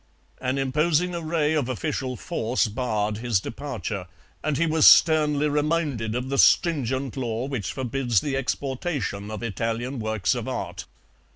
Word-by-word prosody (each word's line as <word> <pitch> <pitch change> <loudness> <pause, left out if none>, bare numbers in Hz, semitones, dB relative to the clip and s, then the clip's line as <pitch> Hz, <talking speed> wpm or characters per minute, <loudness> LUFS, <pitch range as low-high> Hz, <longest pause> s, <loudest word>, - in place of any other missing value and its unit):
An 130 +2 -1
imposing 155 +6 +1
array 160 -2 0
of 145 -5 0
official 130 0 -2
force 115 +1 -1
barred 110 -2 -1
his 115 -4 +1
departure, 115 -5 -5 0.4
and 150 -3 0
he 170 - +2
was 160 -1 +5
sternly 150 -2 +6
reminded 145 -7 0
of 125 +1 -3
the 135 0 0
stringent 135 -5 +3
law 120 -2 -2
which 130 -9 -3
forbids 125 -3 0
the 140 +5 -2
exportation 130 - -2
of 110 +2 -6
Italian 115 +4 -2
works 110 -4 0
of - - -4
art. - - -4
130 Hz, 145 wpm, -25 LUFS, 115-150 Hz, 0.4 s, sternly